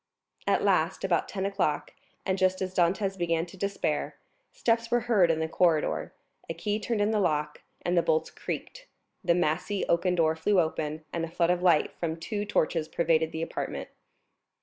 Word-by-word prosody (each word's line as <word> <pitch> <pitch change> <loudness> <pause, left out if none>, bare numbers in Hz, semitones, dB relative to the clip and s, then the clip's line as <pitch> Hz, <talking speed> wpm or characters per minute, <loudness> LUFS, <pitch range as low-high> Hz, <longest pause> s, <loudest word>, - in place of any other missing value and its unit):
At - - +2
last, - - +2
about - - +1
ten 190 -2 -3
o'clock, 195 -7 -1 0.3
and 190 - +1
just 185 0 +2
as 185 -1 -3
Dantès 190 +3 +1
began 165 -1 +1
to 175 - -13
despair, 200 +1 -2 0.4
steps 230 0 0
were 240 0 +2
heard 215 -7 +3
in 160 -1 +2
the 160 - 0
corridor, 165 -1 +1 0.4
a 165 - -3
key 205 +5 -1
turned 220 -1 -1
in 205 +1 +2
the 215 - +2
lock, 150 -5 0 0.2
the 175 0 +3
bolts 160 -1 +1
creaked, - - -6 0.4
the 170 - +3
massy 180 +4 0
oaken 180 +1 +2
door 160 -2 +3
flew 185 +5 +2
open, 155 -1 -1
and 170 - -1
a 165 - -3
flood 170 +1 +2
of 180 0 0
light 170 -4 +3
from 165 -1 -2
two 205 +4 -3
torches 165 -5 0
pervaded 160 -1 +1
the 160 0 -3
apartment. - - -4
175 Hz, 180 wpm, -28 LUFS, 160-195 Hz, 0.4 s, heard